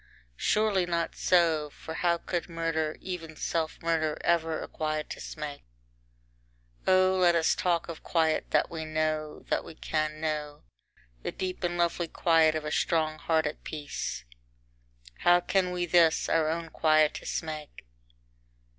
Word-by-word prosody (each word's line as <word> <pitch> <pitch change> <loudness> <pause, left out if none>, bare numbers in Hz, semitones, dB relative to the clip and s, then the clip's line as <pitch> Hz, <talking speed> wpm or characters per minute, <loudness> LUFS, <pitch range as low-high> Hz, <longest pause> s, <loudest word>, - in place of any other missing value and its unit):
Surely 210 -4 +2
not 170 -1 -1
so! 165 -4 +3
for 160 - -9
how 170 +1 +1
could 175 +1 -3
murder, 165 -2 -1
even 165 -4 -6
self 160 +1 -2
murder 160 -2 +1
ever 165 -2 +1
a - - -7
quietus 155 0 -4
make? 150 -2 -5 1.2
IV - - -3
O 185 0 +4
let 175 -1 +5
us 165 -1 +3
talk 175 -2 0
of 165 -2 -7
quiet 160 -2 +1
that - - +2
we 160 -1 -4
know, 155 -1 -2
that - - +1
we 160 - -11
can 155 -1 -2
know, 150 -2 -3 0.6
the - - -3
deep 185 0 -4
and 175 0 0
lovely 170 0 +1
quiet 160 -1 +3
of 155 -1 -3
a 150 - -3
strong 155 -1 +1
heart 160 -1 +1
at 150 - -4
peace! 145 - -5 1.0
How 175 0 +5
can 185 +1 +1
we 180 -1 -1
this, 170 -2 +4
our 160 -1 +2
own 165 0 -3
quietus, 155 -1 +2
make? 155 - -7
160 Hz, 150 wpm, -29 LUFS, 155-175 Hz, 1.2 s, let